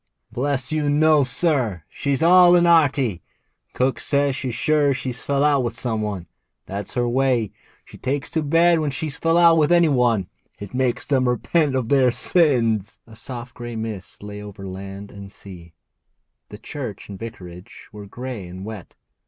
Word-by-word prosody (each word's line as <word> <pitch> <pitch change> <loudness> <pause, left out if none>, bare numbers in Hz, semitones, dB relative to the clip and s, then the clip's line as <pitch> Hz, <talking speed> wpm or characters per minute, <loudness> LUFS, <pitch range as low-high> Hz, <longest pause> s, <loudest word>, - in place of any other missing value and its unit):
'Bless 135 0 -2
you, 155 -2 0
no, 150 0 +4
sir; 125 - 0
she's 140 +2 -2
'ale 180 +1 +7
and 175 0 +4
'earty. 145 - +3 0.5
Cook 130 +1 0
says 140 -1 +1
she's 130 -4 -4
sure 145 0 +2
she've 130 -2 -4
fell 140 +2 0
out 145 -3 +3
with 120 - -3
some 110 -3 -2
one. 100 -5 -4 0.4
That's 100 +4 -6
her 120 -1 +1
way; 125 -3 +1 0.3
she - - -14
takes 135 +2 -2
to 160 - 0
bed 165 +3 +3
when 155 -2 -1
she've 140 +2 -4
fell 165 +2 +1
out 170 -1 +6
with 150 +2 +2
any 170 -2 +5
one. 120 -8 +2 0.3
It 100 +1 -9
makes 125 -1 0
them 130 -3 +1
repent 140 +4 +1
of 125 -3 -1
their 135 -3 +4
sins.' 115 - +1
A 115 - -15
soft 120 +1 -8
grey 120 -1 -7
mist 110 -4 -6
lay 105 0 -8
over 100 -1 -9
land 95 +2 -8
and 100 -1 -11
sea. 85 -5 -13 0.7
The 105 - -9
church 120 -2 -7
and 100 -2 -9
vicarage 95 -6 -10
were 105 -1 -10
grey 120 -3 -7
and 90 +2 -9
wet. 110 -5 -9
125 Hz, 175 wpm, -22 LUFS, 105-145 Hz, 0.7 s, ale